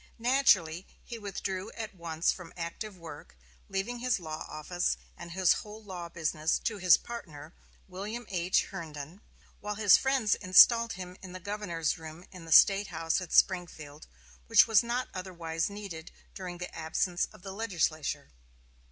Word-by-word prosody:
Naturally, 215 Hz, -9 st, +3 dB, 0.2 s
he 235 Hz, -1 st, -8 dB
withdrew 195 Hz, -1 st, -4 dB
at 225 Hz, -2 st, -6 dB
once 170 Hz, -2 st, 0 dB
from 180 Hz, -3 st, -9 dB
active 185 Hz, +4 st, -6 dB
work, 160 Hz, -, -11 dB, 0.3 s
leaving 210 Hz, +6 st, -3 dB
his 250 Hz, -3 st, +1 dB
law 155 Hz, -2 st, -6 dB
office 175 Hz, +4 st, -2 dB, 0.2 s
and 170 Hz, 0 st, -9 dB
his 185 Hz, -1 st, +4 dB
whole 215 Hz, +1 st, -11 dB
law 180 Hz, -4 st, -7 dB
business 160 Hz, -1 st, 0 dB
to 215 Hz, -3 st, -2 dB
his 180 Hz, -3 st, +6 dB
partner, 160 Hz, -9 st, -9 dB, 0.3 s
William 205 Hz, +6 st, -6 dB
H. 180 Hz, -1 st, +1 dB
Herndon; 165 Hz, 0 st, -8 dB, 0.4 s
while 210 Hz, +1 st, -4 dB
his 205 Hz, -2 st, +6 dB
friends 265 Hz, -6 st, +2 dB
installed 230 Hz, +5 st, +6 dB
him 180 Hz, 0 st, -8 dB
in 185 Hz, -2 st, -10 dB
the 185 Hz, -, -7 dB
governor's 180 Hz, -5 st, -2 dB
room 160 Hz, +2 st, -10 dB
in 180 Hz, -3 st, -11 dB
the 165 Hz, -, -10 dB
State 195 Hz, +4 st, +7 dB
House 165 Hz, 0 st, -1 dB
at 180 Hz, -, -8 dB
Springfield, 160 Hz, -5 st, +1 dB, 0.4 s
which -, -, +7 dB
was 220 Hz, -4 st, +5 dB
not 240 Hz, +2 st, -2 dB
otherwise 170 Hz, -3 st, -3 dB
needed 200 Hz, -6 st, -8 dB, 0.2 s
during 180 Hz, -2 st, -7 dB
the 180 Hz, 0 st, -7 dB
absence 170 Hz, +2 st, -1 dB
of -, -, -17 dB
the 195 Hz, -, -6 dB
legislature. 170 Hz, -, -2 dB
185 Hz, 155 wpm, -30 LUFS, 165-205 Hz, 0.4 s, State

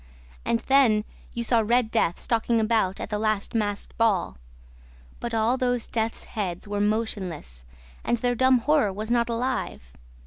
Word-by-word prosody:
And 230 Hz, -, +1 dB
then 240 Hz, -6 st, +4 dB, 0.3 s
you 235 Hz, -, -2 dB
saw 235 Hz, 0 st, +3 dB
Red 235 Hz, +1 st, +2 dB
Death 175 Hz, -6 st, +1 dB
stalking 230 Hz, 0 st, +1 dB
about 215 Hz, -4 st, +1 dB
at -, -, -6 dB
the 210 Hz, -, -1 dB
last 215 Hz, -2 st, -1 dB
masked 205 Hz, -3 st, -2 dB
ball. 195 Hz, -, +1 dB, 0.8 s
But 235 Hz, -1 st, -3 dB
all 225 Hz, +3 st, +2 dB
those 245 Hz, -2 st, 0 dB
death's 225 Hz, 0 st, -2 dB
heads 190 Hz, -3 st, -4 dB
were 205 Hz, 0 st, -2 dB
motionless 195 Hz, -, -2 dB, 0.4 s
and 240 Hz, -, +1 dB
their 245 Hz, +1 st, 0 dB
dumb 260 Hz, +1 st, +4 dB
horror 275 Hz, -3 st, +2 dB
was 215 Hz, +4 st, -5 dB
not 240 Hz, 0 st, +2 dB
alive. 235 Hz, -, -3 dB
225 Hz, 160 wpm, -25 LUFS, 205-240 Hz, 0.8 s, then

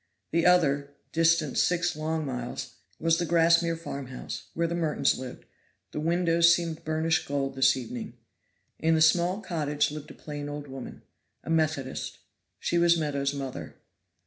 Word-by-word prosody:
The 170 Hz, +2 st, +3 dB
other, 145 Hz, -5 st, +3 dB, 0.2 s
distant 165 Hz, -3 st, +2 dB
six 175 Hz, 0 st, +2 dB
long 155 Hz, 0 st, -2 dB
miles, 125 Hz, -3 st, -5 dB, 0.3 s
was 165 Hz, +1 st, +2 dB
the 175 Hz, -, 0 dB
Grassmere 165 Hz, 0 st, +4 dB
farmhouse, 135 Hz, -6 st, -6 dB
where 170 Hz, -, +1 dB
the 165 Hz, -, -1 dB
Mertons 165 Hz, -3 st, +1 dB
lived; 130 Hz, -1 st, -8 dB, 0.5 s
the -, -, -4 dB
windows 170 Hz, +1 st, +4 dB
seemed 165 Hz, -1 st, 0 dB
burnished 160 Hz, +1 st, 0 dB
gold 140 Hz, -1 st, -1 dB
this 135 Hz, 0 st, +4 dB
evening. 120 Hz, -1 st, -6 dB, 0.6 s
In 160 Hz, 0 st, +3 dB
the -, -, +2 dB
small 175 Hz, +5 st, +3 dB
cottage 150 Hz, -6 st, 0 dB
lived 150 Hz, -1 st, -7 dB
a -, -, -11 dB
plain 145 Hz, -1 st, -6 dB
old 145 Hz, 0 st, -6 dB
woman 135 Hz, -1 st, -9 dB, 0.4 s
a -, -, -4 dB
Methodist. 155 Hz, -5 st, -1 dB, 0.4 s
She 170 Hz, -, +1 dB
was 170 Hz, 0 st, +5 dB
Meadows' 140 Hz, -3 st, -1 dB
mother. 135 Hz, -2 st, -6 dB
160 Hz, 150 wpm, -28 LUFS, 140-170 Hz, 0.6 s, was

